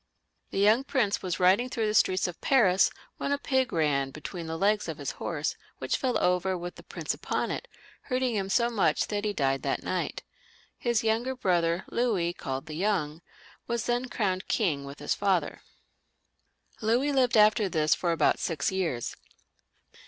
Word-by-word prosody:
The -, -, -6 dB
young 215 Hz, +6 st, +4 dB
prince 235 Hz, -8 st, 0 dB
was 180 Hz, -2 st, -3 dB
riding 190 Hz, +8 st, +4 dB
through 230 Hz, -3 st, -1 dB
the 210 Hz, -, 0 dB
streets 185 Hz, -3 st, +3 dB
of 175 Hz, -, -8 dB
Paris 195 Hz, -9 st, +4 dB, 0.3 s
when -, -, -2 dB
a 285 Hz, -, +2 dB
pig 265 Hz, -3 st, 0 dB
ran 145 Hz, -4 st, +1 dB
between 165 Hz, +4 st, -7 dB
the 160 Hz, 0 st, -3 dB
legs 205 Hz, +4 st, +2 dB
of -, -, -4 dB
his -, -, -4 dB
horse, -, -, -2 dB, 0.2 s
which -, -, -1 dB
feU 255 Hz, -4 st, 0 dB
over 180 Hz, +1 st, +1 dB
with 175 Hz, +1 st, -6 dB
the -, -, -13 dB
prince -, -, -4 dB
upon -, -, -2 dB
it, -, -, -5 dB, 0.4 s
hurting 255 Hz, -1 st, +1 dB
him 195 Hz, -3 st, -1 dB
so 235 Hz, +3 st, +2 dB
much 170 Hz, -9 st, +1 dB
that 205 Hz, 0 st, -2 dB
he 210 Hz, -, +1 dB
died 135 Hz, -7 st, 0 dB
that -, -, -2 dB
night. -, -, -3 dB, 0.6 s
His 235 Hz, -2 st, +1 dB
younger 230 Hz, +4 st, 0 dB
brother, 175 Hz, -5 st, +1 dB
Louis, 200 Hz, -8 st, 0 dB
called 135 Hz, -5 st, -5 dB
the 155 Hz, -, -8 dB
Young, 165 Hz, -3 st, -1 dB, 0.5 s
was 235 Hz, -1 st, -1 dB
then 245 Hz, +1 st, -1 dB
crowned 190 Hz, -5 st, -1 dB
king 155 Hz, -, 0 dB
with 140 Hz, +1 st, -9 dB
his 145 Hz, -, -1 dB
father. 195 Hz, -3 st, 0 dB, 1.2 s
Louis 240 Hz, +6 st, +2 dB
lived 255 Hz, -4 st, +3 dB
after 210 Hz, -1 st, +5 dB
this 155 Hz, -2 st, +2 dB
for 175 Hz, -, 0 dB
about 165 Hz, -, +2 dB
six 160 Hz, 0 st, -1 dB
years. 170 Hz, -11 st, -2 dB
195 Hz, 175 wpm, -28 LUFS, 170-235 Hz, 1.2 s, after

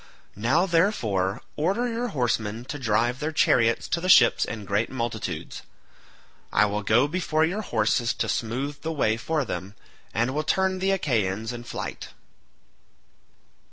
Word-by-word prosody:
Now, 130 Hz, -, +2 dB
therefore, 115 Hz, -, +1 dB
order 195 Hz, +11 st, 0 dB
your 240 Hz, +1 st, -2 dB
horsemen 120 Hz, -, -1 dB
to 145 Hz, +2 st, -6 dB
drive 120 Hz, +1 st, +1 dB
their 155 Hz, +1 st, -2 dB
chariots 115 Hz, -6 st, +2 dB
to 170 Hz, -, 0 dB
the 185 Hz, -, -2 dB
ships -, -, +6 dB
in 110 Hz, -3 st, -6 dB
great 100 Hz, +3 st, 0 dB
multitudes. 115 Hz, -9 st, -4 dB, 0.9 s
I -, -, +4 dB
will 105 Hz, 0 st, -2 dB
go 115 Hz, +7 st, +3 dB
before 160 Hz, -1 st, +1 dB
your 190 Hz, +6 st, -2 dB
horses 115 Hz, -, +1 dB
to -, -, -1 dB
smooth 135 Hz, +5 st, -3 dB
the 160 Hz, -, -3 dB
way 125 Hz, -8 st, +1 dB
for 150 Hz, +5 st, -1 dB
them, 100 Hz, -2 st, -5 dB, 0.4 s
and 120 Hz, +3 st, 0 dB
will 155 Hz, +2 st, -1 dB
turn 190 Hz, +3 st, +1 dB
the 190 Hz, +1 st, 0 dB
Achaeans 115 Hz, -, 0 dB
in 120 Hz, 0 st, -8 dB
flight." -, -, -6 dB
125 Hz, 150 wpm, -25 LUFS, 110-160 Hz, 0.9 s, ships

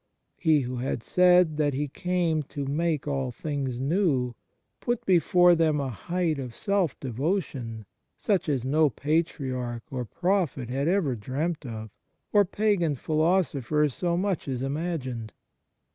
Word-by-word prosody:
He 155 Hz, -3 st, +4 dB
who 125 Hz, 0 st, -4 dB
had 120 Hz, -2 st, -2 dB
said 180 Hz, -3 st, +4 dB
that 145 Hz, -3 st, +1 dB
He 145 Hz, +2 st, -1 dB
came 170 Hz, +1 st, 0 dB
to 140 Hz, -1 st, -4 dB
make 155 Hz, +1 st, -1 dB
all 135 Hz, -3 st, -1 dB
things 135 Hz, -2 st, -3 dB
new 135 Hz, -4 st, +1 dB, 0.5 s
put 240 Hz, -1 st, -2 dB
before 180 Hz, -1 st, +5 dB
them 160 Hz, -3 st, +2 dB
a 140 Hz, -2 st, -2 dB
height 165 Hz, -, -1 dB
of 125 Hz, -4 st, -6 dB
self 200 Hz, -7 st, 0 dB
devotion 130 Hz, -, -3 dB, 0.3 s
such 195 Hz, -6 st, 0 dB
as 130 Hz, -4 st, 0 dB
no 150 Hz, +3 st, +3 dB
patriarch 130 Hz, -5 st, -2 dB
or 130 Hz, -2 st, -2 dB
prophet 170 Hz, -, -1 dB
had 135 Hz, +4 st, -1 dB
ever 170 Hz, -8 st, +2 dB
dreamt 140 Hz, +7 st, -3 dB
of, 110 Hz, -2 st, -7 dB, 0.4 s
or 205 Hz, -1 st, +6 dB
pagan 195 Hz, -6 st, +1 dB
philosopher 155 Hz, -2 st, +1 dB
so 170 Hz, +5 st, -1 dB
much 190 Hz, -4 st, -1 dB
as 130 Hz, -1 st, -2 dB
imagined. 135 Hz, -6 st, -3 dB
150 Hz, 140 wpm, -27 LUFS, 130-175 Hz, 0.5 s, or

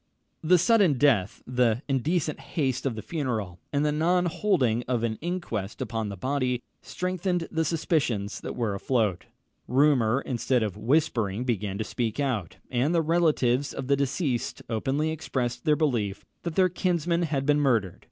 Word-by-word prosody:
The 180 Hz, +3 st, +5 dB
sudden 200 Hz, -3 st, +4 dB
death, 125 Hz, -8 st, +2 dB
the 125 Hz, 0 st, +1 dB
indecent 150 Hz, +4 st, 0 dB
haste 135 Hz, -4 st, -1 dB
of 125 Hz, -, -2 dB
the 110 Hz, -, -6 dB
funeral, 115 Hz, -, -3 dB
and 145 Hz, 0 st, +1 dB
the 150 Hz, -, +2 dB
non 175 Hz, +4 st, +2 dB
holding 155 Hz, -, +1 dB
of 120 Hz, -2 st, 0 dB
an 110 Hz, -2 st, -1 dB
inquest 160 Hz, -, -3 dB
upon 115 Hz, -4 st, -3 dB
the 100 Hz, -, -6 dB
body, 130 Hz, +1 st, -1 dB, 0.2 s
strengthened 180 Hz, -1 st, -2 dB
the 160 Hz, 0 st, +1 dB
suspicions 145 Hz, -, 0 dB
that -, -, -5 dB
were 115 Hz, -4 st, -1 dB
afloat. 105 Hz, -3 st, 0 dB, 0.4 s
Rumour, 130 Hz, -2 st, +3 dB
instead 125 Hz, -1 st, 0 dB
of 105 Hz, -4 st, -3 dB
whispering, 120 Hz, -6 st, +1 dB
began 105 Hz, -5 st, -2 dB
to 110 Hz, -, -1 dB
speak 115 Hz, +2 st, -3 dB
out; 120 Hz, -, -2 dB
and 130 Hz, +7 st, +1 dB
the 165 Hz, -, +3 dB
relatives 150 Hz, -5 st, +2 dB
of -, -, -4 dB
the 140 Hz, +2 st, +3 dB
deceased 135 Hz, -2 st, -1 dB
openly 135 Hz, +8 st, 0 dB
expressed 125 Hz, -6 st, -3 dB
their 150 Hz, -, +4 dB
belief 120 Hz, -11 st, -1 dB, 0.2 s
that 170 Hz, -2 st, -4 dB
their 185 Hz, -1 st, +5 dB
kinsman 175 Hz, -1 st, 0 dB
had 145 Hz, -5 st, -1 dB
been 150 Hz, 0 st, +3 dB
murdered. 115 Hz, -10 st, +1 dB
135 Hz, 160 wpm, -27 LUFS, 115-160 Hz, 0.4 s, The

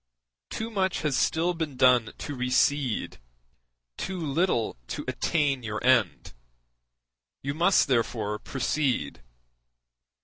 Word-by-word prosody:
Too 225 Hz, +1 st, -4 dB
much 190 Hz, -3 st, 0 dB
has 150 Hz, -3 st, 0 dB
still 170 Hz, +6 st, +1 dB
been 160 Hz, -5 st, -4 dB
done 125 Hz, -4 st, +4 dB
to 145 Hz, -, -6 dB
recede, 130 Hz, 0 st, 0 dB, 0.8 s
too 190 Hz, 0 st, -4 dB
little 155 Hz, -6 st, 0 dB
to -, -, -5 dB
attain 145 Hz, -5 st, 0 dB
your 110 Hz, -2 st, -4 dB
end; 125 Hz, -8 st, +2 dB, 1.1 s
you 140 Hz, +1 st, -2 dB
must 175 Hz, +6 st, +3 dB
therefore 115 Hz, -4 st, 0 dB
proceed. 135 Hz, -, -2 dB
135 Hz, 105 wpm, -27 LUFS, 125-160 Hz, 1.1 s, done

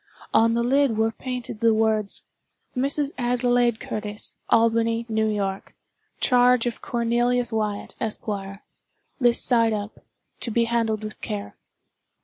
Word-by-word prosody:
On 230 Hz, +1 st, +4 dB
the 235 Hz, -, +1 dB
lid 265 Hz, -2 st, +2 dB
were 225 Hz, 0 st, +2 dB
painted 250 Hz, -2 st, -6 dB
the 230 Hz, 0 st, +4 dB
words—"Mrs. 225 Hz, +6 st, -2 dB
Adelaide 245 Hz, -1 st, +2 dB
Curtis, 210 Hz, 0 st, -5 dB
Albany, 230 Hz, 0 st, +2 dB
New 220 Hz, -1 st, +1 dB
York. 195 Hz, -2 st, -3 dB, 0.4 s
Charge 250 Hz, -1 st, +4 dB
of 240 Hz, -2 st, -3 dB
Cornelius 240 Hz, +1 st, 0 dB
Wyatt, 210 Hz, -2 st, -2 dB
Esq. 220 Hz, -1 st, -3 dB, 0.9 s
This 240 Hz, -2 st, +4 dB
side 230 Hz, -2 st, +3 dB
up. 205 Hz, 0 st, -5 dB, 0.4 s
To -, -, -4 dB
be 235 Hz, +1 st, +2 dB
handled 230 Hz, -2 st, 0 dB
with 215 Hz, 0 st, -7 dB
care." 100 Hz, -1 st, -5 dB
230 Hz, 125 wpm, -24 LUFS, 220-245 Hz, 0.9 s, On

